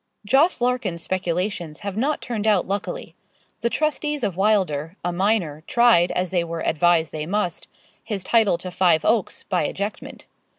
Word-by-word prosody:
Jos. 275 - +3
Larkins's 245 -9 0
speculations 180 -2 -2
have 200 -2 -4
not 275 +7 -1
turned 220 -3 -3
out 205 -5 +3
luckily. 205 - -4 0.5
The 235 - 0
trustees 300 0 -1
of 200 -5 -1
Wylder, 185 -6 +1
a 175 - 0
minor, 180 -5 0
tried, 235 -8 +4
as 180 -1 -1
they 175 -2 +1
were 165 0 -5
advised 165 0 +2
they 155 -1 -4
must, 190 -3 -2 0.4
his 205 -5 -3
title 215 -4 +3
to 180 +1 -7
Five 180 -3 +2
Oaks, 220 -3 +1
by 180 - 0
ejectment. 200 +2 -6
190 Hz, 160 wpm, -23 LUFS, 175-225 Hz, 0.5 s, tried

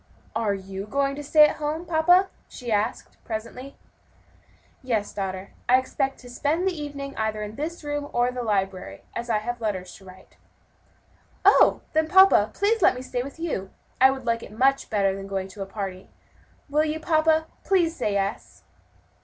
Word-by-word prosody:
"Are 220 -3 +1
you 195 +1 -7
going 275 +4 0
to 295 - -6
stay 300 +1 +7
at - - -4
home, 310 +3 -3
papa?" 355 +3 +4 0.2
she 245 -3 -7
asked 210 0 -2
presently. 235 +5 -6 1.1
"Yes, 230 -6 -2
daughter, 190 -1 -4 0.2
I 255 - +7
expect 270 +1 -2
to 245 - -12
spend 310 +8 0
the 380 - +1
evening 285 -2 -6
either 220 -1 -1
in 210 0 -6
this 325 +5 -5
room 290 0 -3
or 245 +1 +1
the 250 0 -4
library, 195 -4 -2
as 235 +1 -4
I 220 - +3
have 240 +3 -4
letters 185 -5 -3
to 195 - -18
write." 185 0 -16 1.1
"Oh, - - +6
then, 315 0 +2
papa, 380 +3 +6
please 435 +2 +1
let 325 - +5
me 250 - -6
stay 250 -1 -3
with 275 +4 -8
you! 305 - -3 0.3
I 265 - +8
would 265 -1 -4
like 230 -1 0
it - - -10
much 265 +5 +2
better 195 -2 +1
than 195 0 -7
going 195 -1 -3
to 190 - -14
the 195 - -4
party; 195 -2 -6 0.6
will 300 +1 +2
you, 310 0 -2
papa? 315 0 +2 0.2
please 345 -4 +2
say 210 - -1
yes." 200 0 -3
250 Hz, 180 wpm, -25 LUFS, 205-300 Hz, 1.1 s, I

